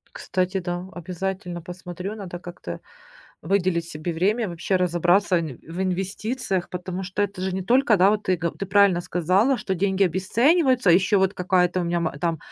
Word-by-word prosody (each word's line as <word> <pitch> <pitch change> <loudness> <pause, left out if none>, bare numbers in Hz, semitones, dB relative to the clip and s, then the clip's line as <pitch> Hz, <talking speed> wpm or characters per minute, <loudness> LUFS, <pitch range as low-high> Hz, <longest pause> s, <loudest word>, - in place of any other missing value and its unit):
Кстати, 185 +1 -1
да, 175 0 -4
обязательно 180 0 -5
посмотрю. 180 +3 -7
Надо 185 -4 -7
как-то 175 - -8 0.6
выделить 180 -1 +1
себе 165 +1 -4
время 205 +6 +1
вообще 175 +3 -1
разобраться 180 +1 +2
нь 150 -6 -6
в 170 +4 -6
инвестициях, 190 +2 -2
потому 180 +1 -5
что 190 +2 -4
это 200 -2 -2
же 190 0 -1
не 190 - -2
только, 240 -1 +3
да, 190 - +6
вот 210 0 +1
ты 185 -3 +1
го 170 0 -1
ты 195 - -6
правильно 195 -2 +4
сказала, 185 - +2
что 190 - -2
деньги 190 +1 +1
обесцениваются. 245 - +2
А - - +8
ещё 195 +3 +4
вот 190 +1 +1
какая-то 180 0 +1
у - - -1
меня 170 0 0
ма 160 -4 -3
там 165 +1 -1
185 Hz, 180 wpm, -24 LUFS, 175-195 Hz, 0.6 s, А